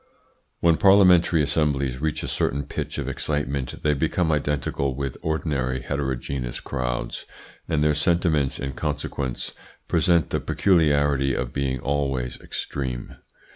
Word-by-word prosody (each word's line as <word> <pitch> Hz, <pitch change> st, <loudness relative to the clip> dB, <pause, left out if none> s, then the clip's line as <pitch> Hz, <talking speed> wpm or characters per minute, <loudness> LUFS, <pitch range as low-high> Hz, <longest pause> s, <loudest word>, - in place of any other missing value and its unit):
When 85 Hz, -1 st, +4 dB
parliamentary 90 Hz, -5 st, +6 dB
assemblies 70 Hz, -3 st, 0 dB
reach 80 Hz, -1 st, -1 dB
a -, -, -3 dB
certain 70 Hz, +1 st, 0 dB
pitch 70 Hz, -, -5 dB
of -, -, -3 dB
excitement 70 Hz, -3 st, -2 dB
they 75 Hz, -, +3 dB
become 80 Hz, +4 st, +1 dB
identical 70 Hz, -2 st, -1 dB
with 70 Hz, -1 st, -3 dB
ordinary 70 Hz, -5 st, -1 dB
heterogeneous 65 Hz, -2 st, -3 dB
crowds, 60 Hz, -3 st, -3 dB, 0.4 s
and 80 Hz, -3 st, +1 dB
their 75 Hz, 0 st, +4 dB
sentiments 75 Hz, -2 st, +1 dB
in 65 Hz, +1 st, -3 dB
consequence 65 Hz, -1 st, -3 dB, 0.4 s
present 85 Hz, -3 st, +2 dB
the -, -, +1 dB
peculiarity 75 Hz, -6 st, +2 dB
of 60 Hz, -1 st, -3 dB
being 65 Hz, -2 st, -1 dB
always 70 Hz, -3 st, -1 dB
extreme. 65 Hz, -4 st, -4 dB
70 Hz, 125 wpm, -24 LUFS, 65-80 Hz, 0.4 s, parliamentary